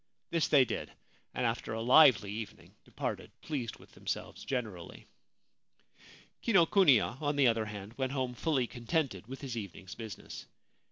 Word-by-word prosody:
This 165 Hz, -2 st, +2 dB
they 140 Hz, -3 st, +6 dB
did, 115 Hz, -, -4 dB, 0.4 s
and 125 Hz, -, -2 dB
after 115 Hz, -1 st, -2 dB
a 110 Hz, -, -3 dB
lively 125 Hz, -6 st, +6 dB
evening 110 Hz, +1 st, -8 dB
departed -, -, -5 dB
pleased 130 Hz, -7 st, -4 dB
with -, -, -18 dB
themselves -, -, -5 dB
generally. 110 Hz, -10 st, -5 dB, 1.4 s
Kinokuniya, 165 Hz, -, +4 dB
on 145 Hz, -1 st, 0 dB
the 140 Hz, -2 st, +4 dB
other 115 Hz, -2 st, +3 dB
hand, 105 Hz, 0 st, -8 dB
went 130 Hz, -1 st, 0 dB
home 130 Hz, -3 st, -1 dB
fully 135 Hz, -1 st, 0 dB
con 120 Hz, -1 st, -11 dB
tented 135 Hz, -, 0 dB
with 135 Hz, +2 st, -8 dB
his 130 Hz, -4 st, -5 dB
evening's 100 Hz, -3 st, -7 dB
business. 110 Hz, -3 st, -8 dB
125 Hz, 150 wpm, -32 LUFS, 110-140 Hz, 1.4 s, they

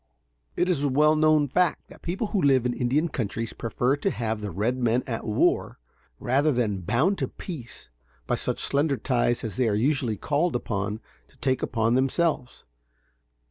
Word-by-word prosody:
It -, -, +1 dB
is 175 Hz, -6 st, +1 dB
a 145 Hz, -, +1 dB
well 150 Hz, +3 st, +4 dB
known 155 Hz, -1 st, +4 dB
fact 180 Hz, +6 st, 0 dB
that -, -, -15 dB
people 185 Hz, +6 st, -2 dB
who 200 Hz, -, +2 dB
live 135 Hz, -4 st, +3 dB
in 125 Hz, -, +1 dB
Indian 135 Hz, +7 st, +1 dB
countries 115 Hz, -5 st, -3 dB
prefer 120 Hz, +4 st, 0 dB
to 170 Hz, -, 0 dB
have 110 Hz, -, -3 dB
the 105 Hz, -, -4 dB
red 105 Hz, +8 st, -1 dB
men 120 Hz, 0 st, +1 dB
at 115 Hz, -3 st, -4 dB
war, 105 Hz, -, +1 dB, 0.4 s
rather 140 Hz, +5 st, +2 dB
than 110 Hz, -7 st, 0 dB
bound 130 Hz, -, +1 dB
to -, -, 0 dB
peace 145 Hz, -11 st, -9 dB, 0.4 s
by -, -, -1 dB
such -, -, -2 dB
slender 140 Hz, 0 st, +1 dB
ties 120 Hz, 0 st, 0 dB
as 115 Hz, -1 st, -5 dB
they 125 Hz, -3 st, +2 dB
are 105 Hz, -, +1 dB
usually 125 Hz, -1 st, +1 dB
called 155 Hz, -, 0 dB
upon 105 Hz, -2 st, -2 dB, 0.3 s
to -, -, -27 dB
take 130 Hz, -2 st, 0 dB
upon 115 Hz, -1 st, +1 dB
themselves. 135 Hz, +1 st, 0 dB
130 Hz, 180 wpm, -26 LUFS, 115-150 Hz, 0.4 s, well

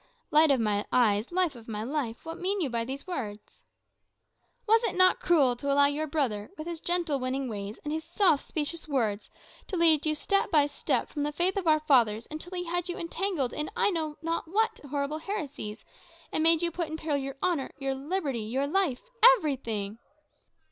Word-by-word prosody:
"Light 310 Hz, +1 st, +6 dB
of 275 Hz, -2 st, +3 dB
my 210 Hz, -2 st, +1 dB
eyes, 220 Hz, -1 st, +2 dB
life 360 Hz, -3 st, +1 dB
of 230 Hz, -2 st, -13 dB
my 215 Hz, -1 st, -4 dB
life, 250 Hz, -2 st, -3 dB
what 325 Hz, 0 st, -6 dB
mean 390 Hz, +3 st, -1 dB
you 295 Hz, -8 st, -1 dB
by 230 Hz, -1 st, 0 dB
these 265 Hz, +4 st, -6 dB
words?" 215 Hz, -, -6 dB, 1.1 s
"Was 450 Hz, +2 st, +5 dB
it -, -, -1 dB
not 370 Hz, 0 st, +5 dB
cruel 285 Hz, -8 st, +3 dB
to 280 Hz, +3 st, -2 dB
allow 285 Hz, 0 st, +5 dB
your 295 Hz, +2 st, 0 dB
brother, 250 Hz, -9 st, -1 dB
with 310 Hz, -, -6 dB
his 340 Hz, -1 st, -5 dB
gentle, 340 Hz, -5 st, 0 dB
winning 260 Hz, +1 st, -2 dB
ways, 205 Hz, -1 st, -5 dB
and 295 Hz, -, -3 dB
his 320 Hz, 0 st, -3 dB
soft 345 Hz, -3 st, +2 dB
specious 320 Hz, +1 st, -4 dB
words, 225 Hz, -8 st, -1 dB, 0.4 s
to 375 Hz, -, -3 dB
lead 320 Hz, -3 st, +5 dB
you 305 Hz, -, +2 dB
step 395 Hz, +6 st, 0 dB
by 300 Hz, -3 st, +4 dB
step 290 Hz, -, -1 dB
from 295 Hz, -, -5 dB
the 295 Hz, +1 st, 0 dB
faith 350 Hz, +5 st, +1 dB
of 390 Hz, -4 st, -2 dB
our 310 Hz, -1 st, +4 dB
fathers, 235 Hz, -7 st, +3 dB
until 350 Hz, +4 st, -6 dB
he 355 Hz, -, -2 dB
had 350 Hz, +1 st, -2 dB
you 350 Hz, -, -3 dB
entangled 335 Hz, -6 st, -2 dB
in 300 Hz, 0 st, -3 dB
I 415 Hz, -, +2 dB
know 315 Hz, -4 st, -2 dB
not 330 Hz, 0 st, -2 dB
what 445 Hz, +6 st, +1 dB
horrible 285 Hz, +2 st, -2 dB
heresies, 295 Hz, -, -5 dB, 0.5 s
and -, -, +1 dB
made 330 Hz, +1 st, +5 dB
you 340 Hz, -, +1 dB
put 335 Hz, 0 st, -3 dB
in 315 Hz, +1 st, -5 dB
peril 310 Hz, -2 st, -1 dB
your 275 Hz, 0 st, -5 dB
honour, 340 Hz, -7 st, 0 dB
your 270 Hz, -1 st, -2 dB
liberty, 280 Hz, -3 st, -2 dB
your 250 Hz, +6 st, -1 dB
life 305 Hz, -4 st, 0 dB, 0.3 s
everything?" 230 Hz, -, -3 dB
300 Hz, 200 wpm, -28 LUFS, 255-340 Hz, 1.1 s, Light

